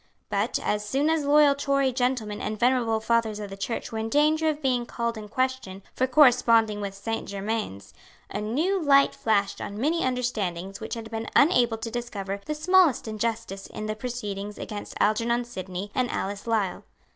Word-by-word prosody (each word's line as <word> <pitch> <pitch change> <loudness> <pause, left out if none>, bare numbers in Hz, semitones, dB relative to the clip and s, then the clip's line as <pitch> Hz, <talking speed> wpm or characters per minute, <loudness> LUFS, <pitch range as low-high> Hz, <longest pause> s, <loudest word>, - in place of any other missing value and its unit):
But, - - 0
as 210 0 0
soon 275 +9 +1
as 320 -3 0
loyal 290 0 +6
Tory 275 -2 +1
gentlemen 245 -5 -1
and 215 0 -3
venerable 240 -3 +2
fathers 220 -1 0
of 205 -2 -6
the - - -5
Church 200 +5 -4
were 220 - -3
in 220 0 -2
danger 310 +4 +3
of 300 -1 -2
being 250 -4 0
called 235 0 -2
in 215 -1 -8
question 255 -6 -2
for 260 - +1
corresponding 230 -6 +4
with 200 -1 -4
Saint 225 +3 -4
Germains, 200 - -4 0.3
a 205 - -4
new 315 - 0
light 280 -2 +5
flashed 205 -3 0
on 205 - -5
many 320 +7 +1
understandings 200 -7 -2
which 220 - -5
had 225 -1 -8
been 225 0 -4
unable 245 -7 +4
to 225 +1 -6
discover 200 -5 -4
the 305 - -3
smallest 345 -5 +3
injustice 220 -2 -3
in 215 - -6
the 215 0 -2
proceedings 210 -4 -5
against 210 -2 -7
Algernon 235 +3 +2
Sidney 190 -3 -6
and 250 -1 0
Alice 200 +3 -4
Lisle. 215 -5 0
230 Hz, 180 wpm, -26 LUFS, 210-260 Hz, 0.3 s, loyal